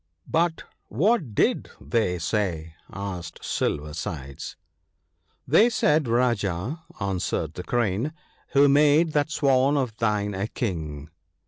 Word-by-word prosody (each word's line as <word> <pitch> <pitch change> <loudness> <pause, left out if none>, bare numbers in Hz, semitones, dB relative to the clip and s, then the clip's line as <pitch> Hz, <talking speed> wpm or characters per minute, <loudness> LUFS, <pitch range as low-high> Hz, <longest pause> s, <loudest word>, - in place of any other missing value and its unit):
' 80 - -41
But 170 -1 -1 0.2
what 160 - +1
did - - +1
they 90 - 0
say? 85 -3 -2
' - - -35
asked 90 -3 -6
Silver 75 0 -1
sides. 70 -4 -6 0.9
'They 205 - +6
said, 155 - +2
Rajah,' 115 - 0 0.2
answered 90 -5 -2
the 90 - -6
Crane, 115 +5 0 0.4
"who 140 +1 +6
made 150 +3 +4
that 145 0 +2
Swan 140 -1 +3
of 125 -5 -1
thine 105 -3 0
a 95 +2 -2
King 80 - -4
105 Hz, 125 wpm, -25 LUFS, 85-140 Hz, 0.9 s, They